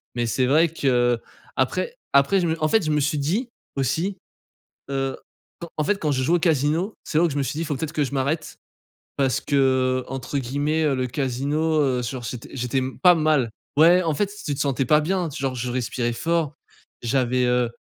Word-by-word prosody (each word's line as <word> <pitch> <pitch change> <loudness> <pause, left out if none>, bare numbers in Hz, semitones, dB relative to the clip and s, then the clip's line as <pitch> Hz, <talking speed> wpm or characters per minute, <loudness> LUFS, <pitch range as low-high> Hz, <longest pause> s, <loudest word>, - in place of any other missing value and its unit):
Mais 120 -1 0
c'est 125 +3 +1
vrai 155 +6 +4
que 120 -6 +1 0.4
après 480 0 0 0.2
après 140 +8 +4
je 175 - +1
me 160 0 -2
en - - +4
fait 220 -4 +3
je 155 - 0
me 150 - +2
suis 150 +2 0
dit, 200 - -1 0.3
aussi, 160 - -1 0.7
heu, 135 -1 -1 0.4
quand 170 - -6
en 155 - +1
fait, 205 - +1
quand 150 - 0
je 130 - 0
joue 165 +6 +3
au - - +2
casino, 160 +5 +1
C'est 155 - -2
là 170 - +4
où - - +1
je 145 - -5
me 140 - +1
suis 140 - -3
dit: 165 - -1
«Faut 145 - -2
peut-être 150 +3 -4
que 150 - +1
je 140 - -7
m'arrête» 140 +4 -2 0.6
parce 135 -2 +1
qu'entre 130 -1 0
guillemets, 145 +5 -1
heu, 145 -3 +2
«le 130 0 0
casino, 145 +5 0
heu, 130 -4 +1
genre 120 +1 -4
j'était 115 +2 -6
j'étais 125 0 -1
m 130 0 -3
pas 180 -1 +7
mal». 155 -7 +2 0.3
Ouais 175 +4 +7
en 165 - 0
fait, 200 +6 0
tu 145 - -1
te 140 - -6
sentais 135 -1 +1
pas 150 +4 +5
bien, 180 +2 -1
genre 135 -4 -2
je 125 0 -3
respirais 120 -1 -1
fort, 165 +1 0 0.5
j'avais, 125 +1 +1
heu 125 -1 +2
140 Hz, 210 wpm, -23 LUFS, 130-160 Hz, 0.7 s, pas